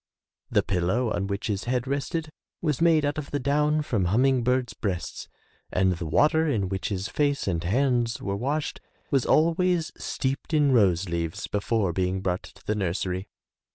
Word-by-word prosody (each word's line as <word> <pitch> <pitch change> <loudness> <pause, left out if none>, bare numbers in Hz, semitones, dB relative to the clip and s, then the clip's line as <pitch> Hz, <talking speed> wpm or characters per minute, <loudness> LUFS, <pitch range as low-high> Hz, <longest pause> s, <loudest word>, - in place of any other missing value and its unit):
The - - +2
pillow 100 +6 0
on 100 - -1
which 100 +1 -3
his 105 -2 -2
head 125 0 0
rested 145 +4 -2 0.3
was 150 -3 -1
made 160 -3 +4
out 145 +1 -1
of 145 - -7
the 145 - -1
down 150 +3 +2
from 110 -10 0
humming 125 +7 +3
birds' 125 0 +1
breasts 95 -6 -4 0.4
and 95 0 +3
the 85 -1 -5
water 160 - +3
in 105 -10 0
which 95 0 -2
his 100 0 -2
face 145 +2 0
and 85 -3 0
hands 120 +3 +1
were 100 -1 -2
washed 145 +8 -2 0.3
was 135 -3 +2
always 170 +1 +2
steeped 135 +4 -2
in 145 -2 +4
rose 100 -7 +3
leaves 85 -1 -3
before 105 -2 0
being 95 +1 0
brought 90 -1 -1
to - - -16
the 105 - 0
nursery. 95 -1 -2
120 Hz, 175 wpm, -26 LUFS, 95-145 Hz, 0.4 s, made